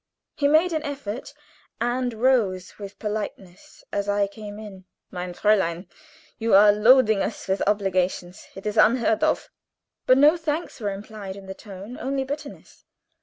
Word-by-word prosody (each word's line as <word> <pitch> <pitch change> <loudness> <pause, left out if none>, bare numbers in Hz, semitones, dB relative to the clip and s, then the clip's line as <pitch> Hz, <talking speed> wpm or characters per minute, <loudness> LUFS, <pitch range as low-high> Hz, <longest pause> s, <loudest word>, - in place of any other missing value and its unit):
He 285 - +2
made 320 +4 +4
an 315 - 0
effort, 275 -5 -6 0.5
and 245 +2 0
rose 220 -8 +1
with 200 -1 -9
politeness 205 -4 -6
as 200 0 -1
I 205 0 +2
came 205 +1 -9
in. 200 -4 -10 0.3
"Mein 180 -1 -5
Fräulein, 190 -4 +1 0.5
you 225 -2 +3
are 205 +1 +8
loading 220 0 +5
us 215 - -4
with 190 0 0
obligations. 190 -2 -1
It 195 - -10
is 210 - -1
quite - - +8
unheard 225 -2 0
of." - - 0 0.6
But 255 - +6
no 300 +5 +6
thanks 320 -1 -3
were 210 -3 -2
implied 200 -1 -7
in 200 -1 -11
the 190 - -6
tone 200 +4 -10
only 270 0 -1
bitterness. 280 +3 -8
210 Hz, 160 wpm, -24 LUFS, 195-255 Hz, 0.6 s, are